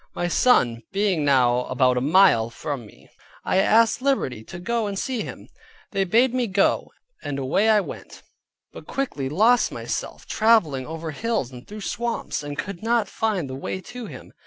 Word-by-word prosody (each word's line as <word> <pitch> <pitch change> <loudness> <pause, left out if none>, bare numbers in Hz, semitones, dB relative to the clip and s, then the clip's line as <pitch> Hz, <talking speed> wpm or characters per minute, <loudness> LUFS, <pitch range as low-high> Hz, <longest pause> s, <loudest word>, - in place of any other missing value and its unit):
My 175 - -1
son 125 - +3
being 195 -5 +1
now 125 -3 +3
about 130 0 +2
a 125 - 0
mile 145 -7 +4
from 120 0 -5
me, - - -19 0.4
I - - +1
asked 225 +5 +4
liberty 260 - 0
to - - -9
go 225 +4 -1
and 200 -1 -4
see 250 +2 -2
him; - - -8 0.4
they 195 -1 0
bade 235 +7 +3
me 250 -2 0
go, 195 0 +1 0.3
and 145 -1 -4
away 145 +11 +1
I 215 -1 +5
went; - - -10 0.5
but - - -11
quickly 150 - -3
lost 225 - +3
myself, - - -5
traveling 175 - +2
over 160 0 -5
hills 220 - -2
and 125 0 -12
through 210 +1 -8
swamps, 235 -2 -3
and 145 -1 -6
could 175 +5 -5
not 230 -1 +1
find 200 -6 -1
the 130 - -7
way 135 +7 -4
to 245 -3 -6
him. - - -11
190 Hz, 180 wpm, -23 LUFS, 135-225 Hz, 0.5 s, I